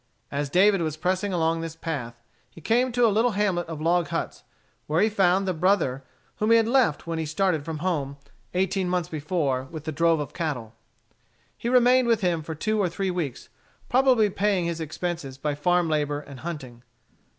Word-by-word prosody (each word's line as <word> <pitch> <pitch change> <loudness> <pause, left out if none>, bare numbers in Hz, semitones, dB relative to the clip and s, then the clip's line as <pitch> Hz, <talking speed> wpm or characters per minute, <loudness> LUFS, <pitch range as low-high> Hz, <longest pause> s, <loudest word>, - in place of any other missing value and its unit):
As 140 0 -2
David 195 +4 +4
was 155 -2 -2
pressing 185 +5 -1
along 165 -2 +1
this 165 -1 -6
path 120 -8 -5 0.3
he - - -14
came 240 +9 +1
to 245 0 +3
a 220 - +3
little 225 +2 +2
hamlet 190 -5 0
of 160 -2 -6
log 170 +1 +2
huts, - - -4 0.4
where 155 +2 +1
he 215 +3 +4
found 195 -2 +2
the 185 - +1
brother 160 -7 +1 0.3
whom 215 - 0
he 230 - +7
had 225 -1 +2
left 240 - +2
when 165 -1 -3
he 160 - -2
started 160 -1 0
from 160 0 -5
home 140 -6 -1 0.4
eighteen 185 0 0
months 180 -2 -1
before 145 -5 -1
with 155 +2 -8
the 155 - -3
drove 165 +1 +2
of 145 - -5
cattle. 130 -10 -4 0.8
He 235 - -3
remained 250 0 +5
with 230 -2 +2
him 175 -3 +1
for 160 +1 -6
two 215 +7 0
or 185 - +1
three 190 +2 -2
weeks, 165 -8 -4 0.4
probably 250 -5 +4
paying 195 -3 +1
his 170 -1 -3
expenses 160 -3 -4
by 150 +2 -2
farm 175 +4 +1
labor 150 -2 0
and 140 -3 -11
hunting. 135 -8 -7
170 Hz, 195 wpm, -25 LUFS, 150-195 Hz, 0.8 s, he